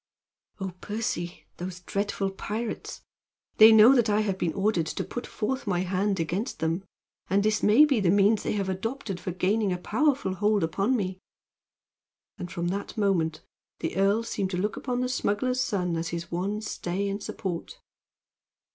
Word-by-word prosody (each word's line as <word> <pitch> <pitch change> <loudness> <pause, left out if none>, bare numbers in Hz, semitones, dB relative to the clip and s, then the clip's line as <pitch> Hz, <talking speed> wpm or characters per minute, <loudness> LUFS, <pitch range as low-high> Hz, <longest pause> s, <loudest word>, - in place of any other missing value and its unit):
"Oh, 190 -2 -4
Percy, 205 -5 -3
those 180 0 -6
dreadful 200 +1 -2
pirates! 215 +4 -5 0.5
They 220 +1 +10
know 220 +4 +8
that 240 -4 +3
I 210 +1 +3
have 200 -3 0
been 165 -2 0
ordered 195 -5 +1
to - - -3
put 245 - -6
forth 260 +2 -3
my 180 -2 +1
hand 190 +1 0
against 180 +9 -2
them; 165 +3 -1 0.5
and 200 +1 +3
this 215 0 +1
may 225 +9 +7
be 275 -6 +2
a 190 -4 +2
means 205 +3 +4
they - - -2
have 200 -2 -1
adopted 195 +1 -3
for - - -5
gaining 190 +3 +1
a 180 - 0
powerful 255 +2 +1
hold 205 +1 +1
upon 195 +10 +1
me!" 185 -3 -3 1.2
And 180 0 -6
from 175 0 -2
that 200 +4 -4
moment 170 -7 +1 0.3
the - - -4
earl 200 +4 +3
seemed 200 -4 -2
to 180 - -3
look 205 +4 -1
upon 250 -1 -2
the 250 - 0
smuggler's 250 +1 0
son 180 -7 -1
as 165 0 -2
his 170 0 -5
one 195 +5 -2
stay 200 -2 -3
and 200 +1 -3
support. 175 -4 -5
200 Hz, 175 wpm, -27 LUFS, 180-215 Hz, 1.2 s, They